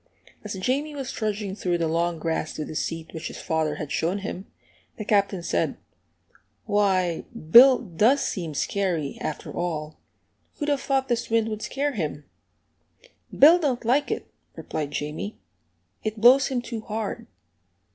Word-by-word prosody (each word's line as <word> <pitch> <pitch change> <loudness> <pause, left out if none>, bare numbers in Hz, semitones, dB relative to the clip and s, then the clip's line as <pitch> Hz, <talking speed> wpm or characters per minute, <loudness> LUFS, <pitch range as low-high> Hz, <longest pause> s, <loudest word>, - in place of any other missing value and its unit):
As 210 -2 -5
Jamie 275 +10 -1
was 270 -3 -4
trudging 210 -2 -3
through 180 -4 0
the 165 -1 0
long 170 +1 0
grass 160 0 -2
to 155 - -3
the - - -7
seat 165 +1 -4
which 160 -1 -5
his - - -8
father 160 -1 -1
had 150 -2 -6
shown 175 +5 0
him, 195 -1 -6 0.5
the 215 - -5
Captain 200 -3 +1
said, - - 0 0.9
"Why, 190 -5 +1 0.3
Bill 255 +4 +10
does 225 +7 +2
seem 165 -6 -3
scary, 175 -5 -1
after 155 - -5
all; 155 -3 -3 0.6
who'd 295 -1 -3
have 285 -2 +1
thought 270 -1 0
this 240 -1 -1
wind 225 -1 +2
would 215 -1 -4
scare 285 +1 -1
him?" 155 - -4 1.1
"Bill 325 +5 +7
don't 260 -7 -1
like 265 +5 +2
it," - - -2 0.3
replied 150 -2 -4
Jamie; 150 +8 -4 0.7
"it 215 0 -3
blows 255 +4 +7
him 250 -3 -2
too 235 -2 -5
hard." 220 +1 -4
205 Hz, 155 wpm, -25 LUFS, 165-245 Hz, 1.1 s, Bill